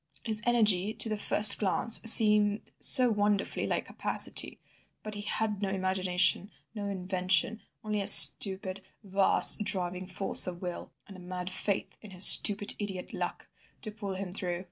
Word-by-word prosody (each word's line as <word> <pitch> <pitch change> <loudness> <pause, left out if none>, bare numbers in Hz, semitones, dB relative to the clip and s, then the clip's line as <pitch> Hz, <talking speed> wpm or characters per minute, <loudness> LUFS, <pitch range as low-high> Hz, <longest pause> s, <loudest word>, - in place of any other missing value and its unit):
His 215 -2 -5
energy 215 -4 -1
to 225 - -1
the 215 - -4
first 210 0 +4
glance 220 +3 0
seemed 210 -2 +4
so 250 -2 +6
wonderfully 205 -1 -4
like - - -5
capacity! - - -5 0.4
But 215 - -10
he 205 - -10
had 210 0 -6
no 200 - -5
imagination, 185 0 -2 0.2
no 205 -2 -9
invention, 190 +4 -3 0.2
only 210 -1 -6
a 200 - -7
stupid, 195 -1 +5 0.2
vast, 195 +1 +2
driving 185 -3 -6
force 190 +1 -1
of 175 -1 -9
will, 180 -1 -10 0.2
and 195 - -16
a - - -15
mad 180 0 -10
faith 195 +1 -5
in 215 - -15
his 185 0 +1
stupid 205 0 +3
idiot 195 -3 -9
'luck' - - -8 0.4
to 215 - -7
pull 205 -2 -10
him 185 -1 -10
through. 180 -3 -7
200 Hz, 160 wpm, -26 LUFS, 185-210 Hz, 0.4 s, so